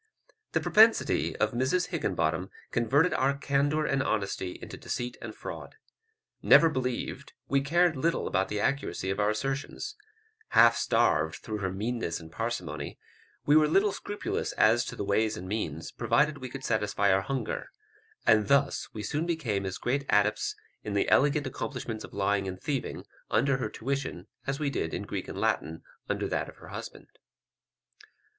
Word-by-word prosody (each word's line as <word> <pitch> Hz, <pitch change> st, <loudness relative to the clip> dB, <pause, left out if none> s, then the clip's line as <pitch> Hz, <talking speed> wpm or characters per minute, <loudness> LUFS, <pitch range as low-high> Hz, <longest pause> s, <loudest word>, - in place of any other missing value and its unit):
This -, -, +1 dB
propensity 225 Hz, +1 st, +4 dB
of 110 Hz, 0 st, +1 dB
Mrs 130 Hz, +9 st, 0 dB
Higginbottom 90 Hz, -, -1 dB, 0.2 s
converted 140 Hz, +9 st, +3 dB
our 140 Hz, +1 st, +1 dB
candour 145 Hz, +2 st, +1 dB
and 135 Hz, -, +1 dB
honesty 100 Hz, -6 st, -2 dB
into -, -, -8 dB
deceit 120 Hz, 0 st, -4 dB
and -, -, -7 dB
fraud. -, -, -8 dB, 0.7 s
Never 165 Hz, -, +7 dB
believed, 130 Hz, -5 st, -3 dB
we 140 Hz, 0 st, +2 dB
cared 170 Hz, +4 st, +3 dB
little 165 Hz, +5 st, 0 dB
about 95 Hz, +1 st, +1 dB
the 105 Hz, -, -2 dB
accuracy 120 Hz, -6 st, -1 dB
of 95 Hz, -, -3 dB
our 105 Hz, 0 st, +3 dB
assertions; 135 Hz, -, -3 dB, 0.6 s
half -, -, +8 dB
starved, -, -, +2 dB
through 110 Hz, -3 st, -5 dB
her 95 Hz, -2 st, -1 dB
meanness 105 Hz, -3 st, -2 dB
and 80 Hz, -1 st, -12 dB
parsimony, 80 Hz, -9 st, -4 dB, 0.5 s
we 145 Hz, -, +5 dB
were 155 Hz, -1 st, +6 dB
little 195 Hz, +6 st, +3 dB
scrupulous 205 Hz, +1 st, -3 dB
as 115 Hz, +2 st, +4 dB
to -, -, -6 dB
the -, -, -3 dB
ways 110 Hz, +2 st, +1 dB
and 90 Hz, -, -7 dB
means, 80 Hz, -7 st, -3 dB
provided 150 Hz, -1 st, +1 dB
we 130 Hz, -1 st, -6 dB
could 135 Hz, +1 st, -8 dB
satisfy 105 Hz, -3 st, +2 dB
our 95 Hz, -, +3 dB
hunger; 135 Hz, +5 st, -3 dB, 0.6 s
and 110 Hz, -2 st, +5 dB
thus 140 Hz, 0 st, +2 dB
we 105 Hz, -, -5 dB
soon 150 Hz, +10 st, -1 dB
became 115 Hz, -, -1 dB
as 95 Hz, -, -4 dB
great 135 Hz, +3 st, 0 dB
adepts 105 Hz, +1 st, +2 dB, 0.3 s
in 105 Hz, -, -4 dB
the 100 Hz, -, +2 dB
elegant 145 Hz, +1 st, +4 dB
accomplishments 125 Hz, -3 st, -4 dB
of -, -, -10 dB
lying 100 Hz, 0 st, 0 dB
and 95 Hz, -1 st, -5 dB
thieving, 140 Hz, +2 st, -3 dB, 0.2 s
under 140 Hz, -1 st, +2 dB
her 120 Hz, -5 st, -2 dB
tuition, 135 Hz, -8 st, -3 dB, 0.2 s
as 135 Hz, +1 st, -1 dB
we 145 Hz, -2 st, 0 dB
did 80 Hz, -10 st, -2 dB
in -, -, -3 dB
Greek -, -, -5 dB
and -, -, -7 dB
Latin 80 Hz, +1 st, -1 dB, 0.3 s
under -, -, -1 dB
that -, -, -2 dB
of -, -, -13 dB
her -, -, -13 dB
husband. -, -, -8 dB
120 Hz, 165 wpm, -29 LUFS, 100-140 Hz, 0.7 s, half